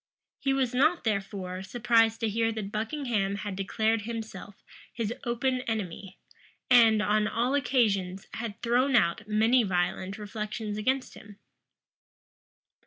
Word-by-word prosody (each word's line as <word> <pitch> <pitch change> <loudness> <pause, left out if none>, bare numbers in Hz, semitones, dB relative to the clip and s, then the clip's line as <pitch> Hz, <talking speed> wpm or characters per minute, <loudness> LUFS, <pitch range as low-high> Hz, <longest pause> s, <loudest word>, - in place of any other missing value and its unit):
He 275 - 0
was 265 -2 0
not, 310 +7 +3
therefore, 195 -3 -3
surprised 225 +2 +2
to 225 - +1
hear 225 +2 +1
that 210 -2 -5
Buckingham 220 -3 -1
had 200 -1 -5
declared 220 +3 0
himself 215 -3 -7 0.3
his 230 -1 -3
open 250 +2 0
enemy, 195 -3 -4 0.5
and, 225 -3 +6
on 210 0 +2
all 240 +5 0
occasions, 210 -9 +1
had 220 -4 -5
thrown 250 +3 +2
out 205 -1 +2
many 220 +4 +4
violent 185 0 -1
reflections 215 0 -5
against 255 +5 -1
him. 205 -1 -13
220 Hz, 125 wpm, -28 LUFS, 200-240 Hz, 0.5 s, and